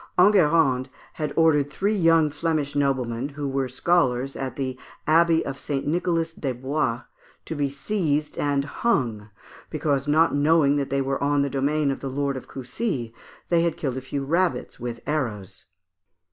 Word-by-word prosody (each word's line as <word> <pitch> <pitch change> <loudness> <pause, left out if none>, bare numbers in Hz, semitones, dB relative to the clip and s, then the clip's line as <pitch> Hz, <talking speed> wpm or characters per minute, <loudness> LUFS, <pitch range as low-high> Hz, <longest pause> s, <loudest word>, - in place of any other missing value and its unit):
Enguerrand 165 -9 +4 0.2
had 155 -1 -3
ordered 150 -3 +3
three 200 +8 0
young 165 -4 +4
Flemish 150 -2 -1
noblemen, 130 -2 0
who 145 0 -5
were 135 -1 -1
scholars 135 -2 +1
at 135 -1 -4
the 130 -2 -3 0.3
Abbey 165 +1 +4
of 135 0 -5
"St. 140 -2 -3
Nicholas 165 0 0
des 135 -5 -3
Bois," 130 -1 -1 0.4
to - - -4
be 145 -2 -1
seized 150 0 -1
and 140 -1 +1
hung, 120 - -1 0.4
because, 145 -2 -1
not 160 +3 +4
knowing 145 0 +3
that 140 -1 -1
they 140 0 0
were 135 +1 -2
on 145 0 +2
the 140 - -2
domain 140 +1 +1
of 135 - -4
the 135 - -4
Lord 140 +1 -1
of 130 - -7
Coucy, 130 - -4 0.4
they 170 -1 +3
had 170 0 0
killed 130 -4 -2
a - - -3
few 135 +1 -4
rabbits 170 +1 0
with 120 -1 -5
arrows. 115 -11 -3
145 Hz, 165 wpm, -24 LUFS, 135-160 Hz, 0.4 s, Enguerrand